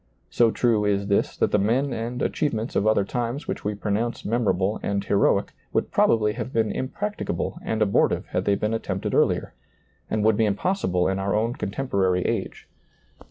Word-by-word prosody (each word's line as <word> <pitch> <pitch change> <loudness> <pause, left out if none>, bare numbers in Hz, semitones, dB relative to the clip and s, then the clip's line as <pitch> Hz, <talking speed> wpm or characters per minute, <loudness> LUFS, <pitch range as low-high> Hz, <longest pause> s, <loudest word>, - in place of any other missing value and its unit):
So 120 -1 +4
true 115 -2 +2
is 100 -1 0
this 100 - +1
that - - +1
the 105 - +3
men 125 +7 +1
and 120 +2 -3
achievements 115 -6 -1
of 105 - +2
other 110 -2 +3
times 120 +6 -3
which - - -4
we 105 0 -2
pronounce 105 +3 -2
memorable 105 -3 0
and 100 -1 -1
heroic 100 0 +2 0.2
would - - 0
probably 105 -2 +3
have 125 - -5
been 110 -4 +1
impracticable 205 - -3
and 110 -1 0
abortive 100 -1 +2
had - - -1
they 100 - +3
been 105 +2 -1
at 115 - -1
tempted - - -3
earlier, - - +1 0.6
and 110 -1 0
would 110 -1 +3
be 110 - +3
impossible 100 - 0
in 95 0 -1
our 100 +1 0
own 115 +3 +1
contemporary 100 -7 0
age. - - -3
110 Hz, 180 wpm, -24 LUFS, 100-120 Hz, 0.6 s, So